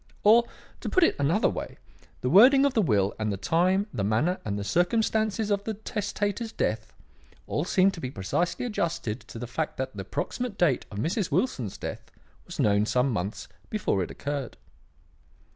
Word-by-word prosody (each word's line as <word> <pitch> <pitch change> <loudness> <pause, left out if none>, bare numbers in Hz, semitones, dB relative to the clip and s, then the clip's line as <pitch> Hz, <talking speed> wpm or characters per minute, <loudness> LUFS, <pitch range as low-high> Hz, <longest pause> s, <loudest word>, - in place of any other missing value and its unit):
Or, 230 +3 +6 0.3
to - - -4
put 370 - +3
it - - +4
in 140 - +2
another 175 +8 +3
way: - - -5 0.4
the 125 - 0
wording 265 - +7
of 280 - +2
the 225 - +3
will 105 - +2
and 110 -1 0
the 100 - -2
time, 185 - +2
the 100 - -2
manner 115 - +1
and 100 -1 -3
the 100 - -3
circumstances 215 - +1
of 200 0 +1
the 220 0 -3
testator's 205 +1 -3
death, 110 - -2 0.5
all 150 - -2
seemed 190 +1 +3
to 165 - -8
be 130 - -3
precisely 130 - -2
adjusted 165 - -2
to - - -11
the 120 - -5
fact 115 -1 -3
that 130 -4 -4
the 100 - -4
approximate 240 - -4
date 155 -8 +2
of 100 - -8
Mrs. 170 - -1
Wilson's 145 - -1
death - - -7 0.4
was - - -8
known 105 0 +3
some 125 +3 +2
months 100 -1 -3 0.2
before 205 - 0
it 90 - -3
occurred. 140 -3 -4
165 Hz, 185 wpm, -27 LUFS, -, 0.5 s, wording